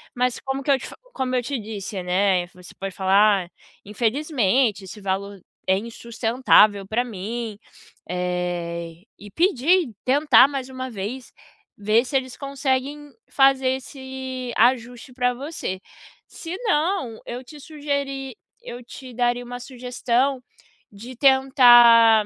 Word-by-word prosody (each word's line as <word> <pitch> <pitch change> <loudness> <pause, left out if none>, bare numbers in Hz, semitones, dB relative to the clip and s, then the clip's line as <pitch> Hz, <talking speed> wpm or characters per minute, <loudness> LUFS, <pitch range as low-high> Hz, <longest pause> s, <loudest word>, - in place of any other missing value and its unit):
mas 250 0 0
como 270 +1 -4
que 280 - +1
eu 270 - +3
te - - -8
fa - - -11 0.2
como 255 - -2
eu 245 - 0
te 275 -1 -3
disse, 205 -2 -6
né, 180 0 +1
você 180 0 -15
pode 195 -1 -7
falar: 195 0 +3
"Ah, - - -20 0.4
infelizmente 235 - 0
esse 210 +3 -10
valor 195 +1 -3 0.3
é 190 - +3
insustentável 225 -2 +2
pra 230 +4 0
mim." 220 +1 -6 0.5
Eh, 175 -1 -3 0.2
e 205 - -11
pedir, 330 - +2
tentar 280 +1 +5
mais 270 -2 -5
uma 260 0 -6
vez, 230 +4 -6 0.5
ver 215 +3 +2
se 270 +1 0
eles 260 -1 -5
conseguem 275 +1 -3 0.2
fazer 270 -1 +3
esse 260 -1 -7
ajuste 245 +1 +1
pra 250 0 0
você. 275 - -5 0.5
Senão, 345 - -2
eu 245 +2 -6
te 295 +3 -13
sugeri 280 -4 -4 0.3
eu 240 +1 -9
te 255 +1 -11
daria 245 0 0
uma 245 0 -7
sugestão 250 +1 -1 0.5
de 230 +6 -11
tentar, 240 -4 +6
245 Hz, 130 wpm, -23 LUFS, 210-265 Hz, 0.5 s, tentar